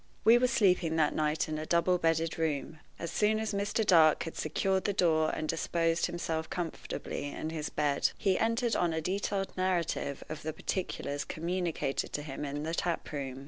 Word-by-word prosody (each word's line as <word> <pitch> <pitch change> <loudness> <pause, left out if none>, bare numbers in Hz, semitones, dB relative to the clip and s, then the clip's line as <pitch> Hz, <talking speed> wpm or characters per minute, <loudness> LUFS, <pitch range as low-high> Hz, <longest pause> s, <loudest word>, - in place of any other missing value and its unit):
We 230 +2 +7
were 250 - +3
sleeping 180 -8 +2
that 155 -2 +2
night 155 0 0
in 155 -1 -3
a 155 - -4
double 175 +1 +3
bedded 165 0 +1
room. 155 -1 -2 0.2
As 170 - -5
soon 215 +1 +2
as 220 -1 -2
Mr. 200 +2 0
Dark 160 -5 +6
had 165 - -6
secured 190 +5 0
the 205 - +1
door 160 -4 +3
and 155 - -3
disposed 165 +1 +1
himself 165 -2 -3
comfortably 170 -4 -4
in 155 +2 -5
his 155 -2 -3
bed, 145 -2 +1
he 195 -2 +1
entered 230 +1 +1
on 170 -2 +1
a 160 - 0
detailed 195 +2 -2
narrative 175 -6 -1
of 155 -1 -6
the 155 0 -4
particulars 145 -4 -3
communicated 170 -4 -2
to 145 - -2
him 145 0 -5
in 145 +1 -4
the 160 +1 -3
tap 170 -1 -2
room. 135 -3 -4
165 Hz, 185 wpm, -31 LUFS, 155-185 Hz, 0.2 s, We